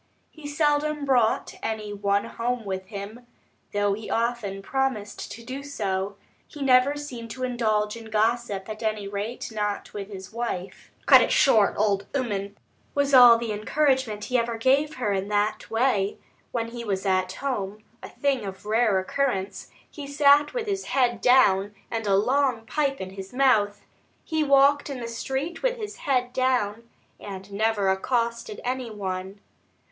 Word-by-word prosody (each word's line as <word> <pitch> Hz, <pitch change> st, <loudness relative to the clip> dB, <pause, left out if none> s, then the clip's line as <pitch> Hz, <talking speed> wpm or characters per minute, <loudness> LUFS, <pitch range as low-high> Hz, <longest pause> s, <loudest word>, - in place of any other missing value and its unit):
He 310 Hz, -2 st, -10 dB
seldom 295 Hz, 0 st, +1 dB
brought 245 Hz, -5 st, +2 dB
any 215 Hz, -2 st, -3 dB
one 200 Hz, 0 st, 0 dB
home 240 Hz, -1 st, -3 dB
with 190 Hz, -1 st, -4 dB
him, 210 Hz, +5 st, -8 dB, 0.4 s
though 205 Hz, -1 st, +1 dB
he 215 Hz, +2 st, -6 dB
often 225 Hz, -4 st, -1 dB
promised 260 Hz, -5 st, -2 dB
to 235 Hz, -, -9 dB
do 260 Hz, +4 st, -6 dB
so; 200 Hz, -8 st, -3 dB, 0.3 s
he 295 Hz, -2 st, -7 dB
never 260 Hz, +2 st, +4 dB
seemed 250 Hz, -6 st, -7 dB
to 255 Hz, +3 st, -6 dB
indulge 215 Hz, -4 st, 0 dB
in 230 Hz, -1 st, -10 dB
gossip, 215 Hz, -2 st, 0 dB
at 215 Hz, -1 st, -7 dB
any 215 Hz, -2 st, -2 dB
rate 205 Hz, +5 st, -5 dB
not 210 Hz, -1 st, -3 dB
with 200 Hz, -1 st, -5 dB
his 190 Hz, 0 st, -9 dB
wife. 195 Hz, -6 st, -5 dB, 0.2 s
"Cut -, -, +8 dB
it -, -, +1 dB
short, 220 Hz, -7 st, +4 dB
old 200 Hz, -1 st, +1 dB
'ooman," 205 Hz, -6 st, -2 dB, 0.4 s
was 285 Hz, -1 st, +1 dB
all 245 Hz, -3 st, +9 dB
the 230 Hz, -1 st, -3 dB
encouragement 240 Hz, 0 st, 0 dB
he 250 Hz, +1 st, +1 dB
ever 235 Hz, 0 st, -2 dB
gave 275 Hz, +6 st, +2 dB
her 230 Hz, -5 st, -1 dB
in 195 Hz, 0 st, -2 dB
that 210 Hz, +1 st, -1 dB
way. 225 Hz, -4 st, +1 dB, 0.3 s
When 230 Hz, -1 st, -2 dB
he 235 Hz, 0 st, -7 dB
was 195 Hz, -3 st, -2 dB
at 185 Hz, -1 st, +1 dB
home 215 Hz, -5 st, -4 dB, 0.2 s
a -, -, -8 dB
thing 275 Hz, -5 st, -1 dB
of 190 Hz, 0 st, -8 dB
rare 215 Hz, -1 st, +2 dB
occurrence 195 Hz, -2 st, -2 dB, 0.2 s
he 290 Hz, -2 st, -9 dB
sat 285 Hz, +1 st, +4 dB
with 485 Hz, -3 st, -3 dB
his 390 Hz, -2 st, -2 dB
head 245 Hz, -4 st, +1 dB
down 205 Hz, -6 st, +4 dB, 0.2 s
and 225 Hz, -2 st, -2 dB
a 195 Hz, -, +4 dB
long 250 Hz, +2 st, +1 dB
pipe 275 Hz, +2 st, -1 dB
in 190 Hz, 0 st, -6 dB
his 195 Hz, +1 st, -9 dB
mouth; 220 Hz, -6 st, +2 dB, 0.4 s
he 315 Hz, -1 st, 0 dB
walked 280 Hz, +1 st, +4 dB
in 270 Hz, -2 st, -5 dB
the 235 Hz, -, -5 dB
street 265 Hz, +7 st, -4 dB
with -, -, 0 dB
his 420 Hz, -2 st, -6 dB
head 250 Hz, -3 st, 0 dB
down, 235 Hz, -3 st, 0 dB, 0.3 s
and 195 Hz, 0 st, -8 dB
never 210 Hz, -1 st, +1 dB
accosted 230 Hz, +2 st, -1 dB
any 255 Hz, -1 st, -2 dB
one. 190 Hz, -1 st, -5 dB
230 Hz, 165 wpm, -25 LUFS, 205-265 Hz, 0.4 s, all